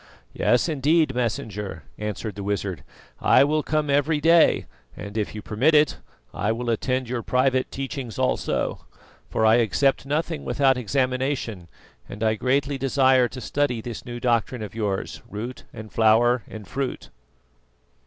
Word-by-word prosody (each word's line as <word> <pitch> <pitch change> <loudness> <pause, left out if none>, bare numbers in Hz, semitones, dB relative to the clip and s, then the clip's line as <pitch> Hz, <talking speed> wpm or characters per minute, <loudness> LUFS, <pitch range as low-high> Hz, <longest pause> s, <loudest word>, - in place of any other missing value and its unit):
"Yes, 120 +6 +2
indeed, 155 0 +2
Messenger," 110 -4 -3 0.2
answered 105 0 -4
the 100 - -7
wizard; 100 -3 -3 0.4
"I - - +5
will 155 +2 +1
come 155 0 -1
every 145 +2 +2
day, 165 +2 +4 0.3
and 100 +1 -8
if 110 -1 -2
you 105 - -6
permit 130 +9 +2
it, 150 -1 +3 0.3
I 105 - 0
will 120 +1 -2
attend 130 +3 -1
your 120 0 -2
private 130 +2 +1
teachings 135 -3 -5
also, 130 -1 -1 0.4
for 110 - +1
I 110 +1 +6
accept 120 +5 +1
nothing 155 +1 -2
without 135 -2 +2
examination, 125 -5 -1 0.4
and 105 +2 -6
I 110 -1 +3
greatly 135 +4 0
desire 130 -1 +3
to 130 - -9
study 140 -2 -1
this 115 0 -7
new 120 -1 -7
doctrine 120 -1 0
of 105 - -7
yours, 105 -3 -3
root 115 +5 -6
and 110 0 -10
flower 115 +2 +4
and 110 -3 -9
fruit." 135 +4 -4
125 Hz, 150 wpm, -24 LUFS, 110-140 Hz, 0.4 s, I